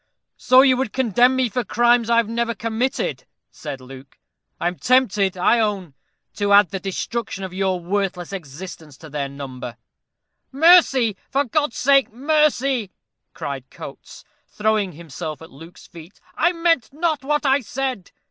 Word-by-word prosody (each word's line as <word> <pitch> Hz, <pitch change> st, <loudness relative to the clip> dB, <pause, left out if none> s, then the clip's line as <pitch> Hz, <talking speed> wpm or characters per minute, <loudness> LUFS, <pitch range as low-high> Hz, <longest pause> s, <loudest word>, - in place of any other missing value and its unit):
"So 255 Hz, +1 st, +5 dB
you 260 Hz, -2 st, +4 dB
would 260 Hz, -4 st, -2 dB
condemn 250 Hz, 0 st, +3 dB
me 260 Hz, -1 st, +1 dB
for 240 Hz, +3 st, -2 dB
crimes 240 Hz, +1 st, +2 dB
I 235 Hz, -, +3 dB
have 230 Hz, -2 st, +3 dB
never 235 Hz, +1 st, -2 dB
committed," 230 Hz, +4 st, -2 dB, 0.3 s
said 145 Hz, -3 st, -7 dB
Luke. 130 Hz, +1 st, -13 dB, 0.4 s
"I -, -, 0 dB
am 175 Hz, 0 st, -4 dB
tempted, 205 Hz, -7 st, +2 dB
I 210 Hz, +6 st, +3 dB
own, 200 Hz, -8 st, -1 dB, 0.4 s
to 205 Hz, -1 st, +1 dB
add 200 Hz, -4 st, +6 dB
the 195 Hz, -, -3 dB
destruction 195 Hz, +2 st, -4 dB
of 185 Hz, -1 st, -6 dB
your 190 Hz, -1 st, -1 dB
worthless 185 Hz, 0 st, -3 dB
existence 160 Hz, -3 st, -9 dB
to 160 Hz, 0 st, -13 dB
their 140 Hz, -1 st, -3 dB
number." 130 Hz, -4 st, -8 dB, 0.7 s
"Mercy, 275 Hz, -, +5 dB
for 280 Hz, +1 st, +1 dB
God's 290 Hz, 0 st, -1 dB
sake, 275 Hz, 0 st, +3 dB
mercy!" 275 Hz, -3 st, +1 dB, 0.5 s
cried 135 Hz, -2 st, -6 dB
Coates, -, -, -11 dB, 0.2 s
throwing 210 Hz, -3 st, 0 dB
himself 155 Hz, 0 st, -7 dB
at 160 Hz, -, -13 dB
Luke's 165 Hz, +6 st, -14 dB
feet. 170 Hz, +3 st, -14 dB, 0.2 s
"I 340 Hz, +2 st, +2 dB
meant 330 Hz, -7 st, +1 dB
not 310 Hz, -1 st, -1 dB
what 295 Hz, +2 st, -1 dB
I 270 Hz, +1 st, +4 dB
said." 255 Hz, -5 st, -4 dB
215 Hz, 155 wpm, -21 LUFS, 175-260 Hz, 0.7 s, add